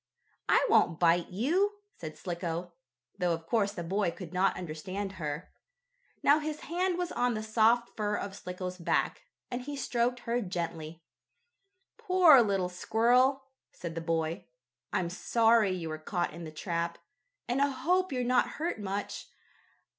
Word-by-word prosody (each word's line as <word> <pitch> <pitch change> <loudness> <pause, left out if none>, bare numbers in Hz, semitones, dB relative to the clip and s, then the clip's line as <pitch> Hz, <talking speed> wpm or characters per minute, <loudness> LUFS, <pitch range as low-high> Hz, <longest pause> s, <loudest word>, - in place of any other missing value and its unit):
"I - - +5
won't 175 - +3
bite 170 0 +3
you," 335 - +1 0.3
said 155 -2 -7
Slicko, 170 -1 -4 0.5
though 175 -1 +2
of 165 0 -11
course 205 +2 +1
the 175 - -5
boy 195 +2 0
could 170 0 -8
not 185 +2 +2
understand 185 +4 -5
her. 150 +2 -4 0.7
Now 290 +2 +6
his 305 0 -4
hand 355 +2 -1
was 355 -1 -2
on 245 -1 +1
the 215 - -3
soft 225 +2 +2
fur 210 -1 -1
of 200 -1 -4
Slicko's 180 -1 -6
back, 175 - 0 0.3
and 245 0 -2
he 285 +3 -5
stroked 245 -2 0
her 235 +1 -1
gently. 170 -4 -5 1.0
"Poor 360 -8 +7
little 195 -4 +1
squirrel," 245 +8 +2 0.3
said 170 -2 -6
the 165 - -4
boy. 165 +2 -2 0.4
"I'm 170 -2 -1
sorry 225 +1 +3
you 180 -3 -3
were 155 0 -5
caught 175 +1 -2
in 170 +1 -7
the 155 - -7
trap, 170 +1 -3 0.5
and 250 +3 0
I 280 - +5
hope 360 +8 +1
you're 250 -2 -1
not 250 0 +2
hurt 320 -6 -2
much. 200 +1 -4
200 Hz, 155 wpm, -30 LUFS, 170-250 Hz, 1.0 s, Poor